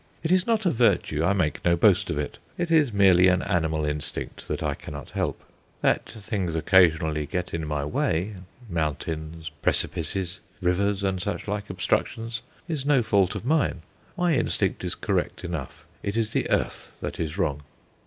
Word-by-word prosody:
It 160 - 0
is 185 +2 +3
not 225 -2 +2
a 180 - +4
virtue; 100 -9 +2
I 90 - +3
make 90 -6 0
no 85 0 +4
boast 85 - +4
of 75 - -1
it. 75 -1 -4 0.2
It 170 -1 -1
is 150 -6 +4
merely 95 -3 +6
an 90 -1 +3
animal 80 -5 0
instinct 75 -2 -4
that - - -2
I - - 0
cannot 75 0 -8
help. - - -2 0.4
That - - +2
things 100 -6 -3
occasionally 80 -3 +3
get 90 -1 -3
in 80 -2 -2
my 75 -1 -1
way 80 +6 0 0.3
mountains, 80 -1 -3
precipices, 90 +2 0 0.2
rivers, 100 +2 +1
and 95 -2 0
such 105 +2 -3
like 105 0 -3
obstructions 115 +5 -1 0.3
is 155 -6 -2
no 140 -3 +3
fault 100 -4 +2
of - - -5
mine. 140 - +1 0.3
My 175 -2 +2
instinct 130 - 0
is - - -2
correct - - -1
enough; 85 -7 -5 0.2
it 100 +2 -2
is 110 -2 +1
the - - 0
earth - - -1
that - - -5
is 80 -1 -3
wrong. 75 -2 0
90 Hz, 175 wpm, -26 LUFS, 80-110 Hz, 0.4 s, merely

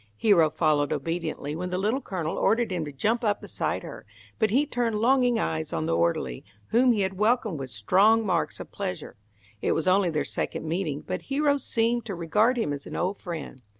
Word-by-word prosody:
Hero 170 - +4
followed 150 -2 +1
obediently, 155 -1 -3
when 180 +2 -4
the 180 - -2
Little 215 +8 0
Colonel 170 -8 -3
ordered 225 -1 +2
him 175 -3 -1
to 145 - -6
jump 220 - 0
up 210 -2 +1
beside - - -3
her, - - -9 0.4
but 220 -2 +3
he 265 +8 +3
turned 240 -6 -1
longing 245 +1 +3
eyes 80 -1 -2
on 80 -1 -2
the 80 0 +1
orderly, 85 -7 0 0.3
whom 250 +2 +4
he 215 -3 +1
had 190 0 -2
welcomed 215 - +1
with 135 -1 -5
strong 195 - +3
marks 175 -4 -1
of - - -9
pleasure. 195 -2 -5 0.5
It - - +1
was 160 - -1
only 185 0 +4
their 150 -3 -1
second - - -3
meeting, 160 -3 -2
but 185 - -3
Hero 285 +1 +2
seemed 235 -2 0
to 200 - -4
regard 210 +9 +2
him 220 -11 0
as 140 0 -7
an - - -7
old 190 +3 -1
friend. 160 -7 -6
185 Hz, 205 wpm, -26 LUFS, 155-225 Hz, 0.5 s, Hero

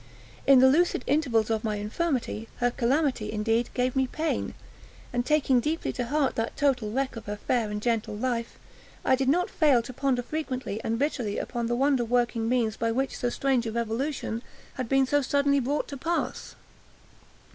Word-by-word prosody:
In 275 -1 +8
the 260 +1 +7
lucid 310 -1 +3
intervals 250 -7 +1
of 220 -1 0
my 215 -2 -1
infirmity, 225 +1 -2
her 245 0 +1
calamity, 255 -1 0
indeed, 225 +2 0
gave 250 0 0
me 265 -1 +2
pain, 315 +5 -2 0.6
and, 245 0 +1
taking 280 -2 +3
deeply 310 +7 -2
to 245 -2 -3
heart 290 0 +1
that 225 0 -2
total 255 -7 +1
wreck 265 +2 -1
of 230 - -9
her 205 - -2
fair 230 0 0
and 210 0 -3
gentle 230 -3 0
life, 235 0 -2 0.5
I - - +4
did 265 0 0
not 355 +5 +3
fail 280 -7 +4
to 255 - -8
ponder, 255 -1 0
frequently 255 -7 -4
and 225 0 -1
bitterly, 250 -6 -1
upon 235 -2 -3
the 240 - 0
wonder 270 -1 +2
working 235 -1 0
means 235 -4 +1
by 230 0 0
which 265 +3 -1
so 245 - -1
strange 255 -1 0
a - - -2
revolution 235 +1 -2 0.3
had 255 -4 -4
been 270 0 +4
so 290 +2 +2
suddenly 280 +1 +2
brought 275 +3 -1
to 280 - -6
pass. 335 +6 -3
250 Hz, 185 wpm, -27 LUFS, 230-275 Hz, 0.6 s, In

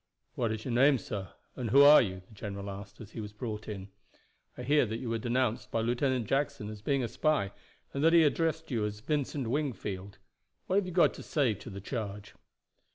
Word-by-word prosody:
"What 115 -2 -1
is 110 0 -4
your 125 - -2
name, 135 +3 +5
sir, 100 -6 -6 0.2
and 125 -4 -3
who 140 +5 +7
are 145 +1 +9
you?" 95 -4 -3
the - - -18
general 100 -1 -6
asked 100 +1 -9
as 110 -2 -10
he - - -7
was 105 -1 -6
brought 110 -1 -5
in. 100 -2 -6 0.7
"I 125 - -5
hear 145 +4 +4
that 110 +1 -3
you 115 -1 -4
were 115 - 0
denounced 120 0 0
by 115 - 0
Lieutenant 125 +1 +1
Jackson 135 -3 -1
as 105 -1 -8
being 135 +3 +1
a - - 0
spy, 145 -8 +1 0.4
and 140 - -1
that 165 - +6
he 170 -1 +7
addressed 160 +1 0
you 115 -4 0
as 105 0 -3
Vincent 145 -1 -1
Wingfield. 110 -8 -3 0.5
What 190 - +1
have 200 -2 +1
you - - -4
got 175 0 +4
to - - -9
say 140 -8 +1
to 105 - -10
the 100 -1 -7
charge?" 105 -2 -5
120 Hz, 220 wpm, -30 LUFS, 105-140 Hz, 0.7 s, are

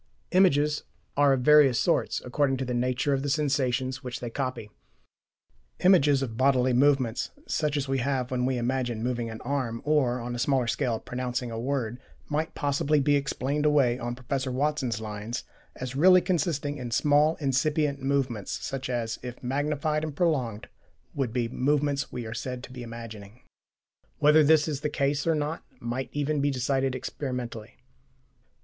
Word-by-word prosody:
Images 150 -5 +3 0.3
are 145 -1 +5
of 130 - 0
various 145 -3 +6
sorts, - - +1
according 135 +1 +1
to 130 - -3
the 125 - -3
nature 125 +3 0
of 135 - 0
the 145 - -2
sensations 130 -3 0
which 125 0 -5
they 120 -1 -5
copy. 130 -5 -4 1.1
Images 145 -7 +5
of 115 -4 -5
bodily 130 -1 +3
movements, 130 -3 +2 0.2
such 150 -1 0
as 140 -1 -2
we 135 0 0
have 130 -1 -1
when 125 -1 0
we 130 -1 0
imagine 120 -2 -1
moving 120 -2 -2
an 110 0 -7
arm 125 -3 -2
or, 135 -5 +2
on 120 0 -5
a 120 - -4
smaller 130 0 +2
scale, 115 0 -1
pronouncing 125 -1 -4
a 115 - -4
word, 125 -2 -2 0.3
might 155 +2 -2
possibly 145 +1 +1
be 145 +1 +3
explained 140 +1 -1
away 140 -5 +3
on 120 0 -3
Professor 130 +1 -3
Watson's 130 -4 -1
lines, 110 +2 -5 0.3
as 130 0 -6
really 185 +5 +7
consisting 160 -5 -1
in 125 -1 -5
small 150 +5 +3
incipient 140 +1 0
movements 135 -6 -1
such 135 -1 -4
as, 120 -3 -2
if 125 0 -8
magnified 150 +3 -1
and 155 -2 -4
prolonged, 130 - 0 0.5
would 135 -5 -1
be 120 0 0
the 115 - -7
movements 145 +1 +1
we 125 -2 -5
are 110 - -5
said 125 +2 -5
to - - -10
be 125 - -7
imagining. 115 -1 -9 0.8
Whether 150 +1 +6
this 155 +1 +4
is 150 -3 -3
the 150 - -1
case 140 +1 0
or 165 - +3
not 150 +2 -3 0.2
might 120 +3 -3
even 145 0 -1
be 145 - +2
decided 135 0 0
experimentally. 125 -4 -5
135 Hz, 170 wpm, -27 LUFS, 125-145 Hz, 1.1 s, really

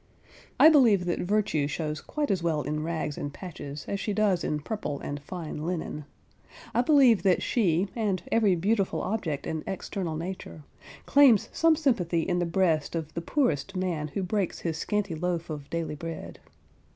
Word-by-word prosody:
I - - +9
believe 235 - +5
that 175 - -1
Virtue 195 -7 +1
shows 155 0 -3
quite 295 -6 -2
as 190 -3 0
well 160 -3 0
in 150 +1 -2
rags 160 -2 -3
and 145 - -4
patches, 145 -3 -8
as 200 - -2
she 210 - -2
does 200 -4 +2
in 150 - -1
purple 150 -6 -4
and 145 0 -5
fine 155 -1 -6
linen. 160 -3 -4 0.7
I 240 - +3
believe 255 -5 +5
that 190 -3 +2
she 190 -5 +2
and 200 -6 -1
every 215 -5 +4
beautiful 195 +3 0
object 175 -9 -2
in 160 -1 -3
external 185 -3 -3
nature, 165 -2 -6 0.4
claims 275 -7 +5
some 330 -1 +4
sympathy 215 - +1
in 175 +1 0
the 175 - 0
breast 165 -4 +1
of 160 -2 -4
the 170 - -3
poorest 195 - 0
man 175 -5 -1
who 190 +6 -3
breaks 190 0 -1
his 160 -2 -2
scanty 205 -4 -1
loaf 170 0 -2
of 145 -2 -7
daily 165 -2 -3
bread. 165 +2 -7
175 Hz, 175 wpm, -27 LUFS, 155-205 Hz, 0.7 s, I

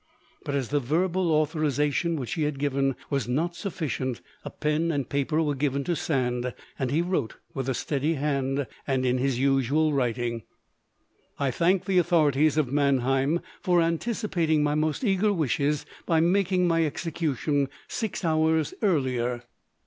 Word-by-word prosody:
But 140 - -3
as 135 -4 -1
the 145 - +2
verbal 170 +6 +1
authorisation 155 +1 +1
which 130 -6 -4
he 160 - -2
had 150 -2 0
given 135 -1 0 0.2
was 140 -6 0
not 160 +8 -1
sufficient, 155 - -3 0.2
a - - -5
pen 155 +2 0
and 140 -5 -1
paper 150 +3 0
were 145 -2 0
given 140 0 -1
to 175 +4 -1
Sand, 125 -5 -1 0.2
and 130 -2 0
he 155 +6 +1
wrote, 175 -10 -1 0.2
with 135 -1 -3
a 130 - 0
steady 145 +5 -1
hand 140 -1 -1 0.2
and 130 -2 +1
in 125 0 +2
his 135 -1 0
usual 135 +3 +2
writing: 120 -3 -1 1.0
"I 140 -2 0
thank 175 +7 +2
the 190 -2 +3
authorities 155 -4 +3
of 140 -4 +1
Mannheim 140 +2 +2 0.2
for 180 -1 +3
anticipating 165 -2 +1
my 150 0 +1
most 155 - 0
eager 205 -1 +2
wishes 150 -4 0 0.2
by 165 -1 +3
making 180 +1 +2
my 165 -1 +3
execution 145 -3 -1 0.2
six 210 -5 -3
hours 160 -1 +2
earlier. 125 - 0
150 Hz, 155 wpm, -26 LUFS, 135-165 Hz, 1.0 s, the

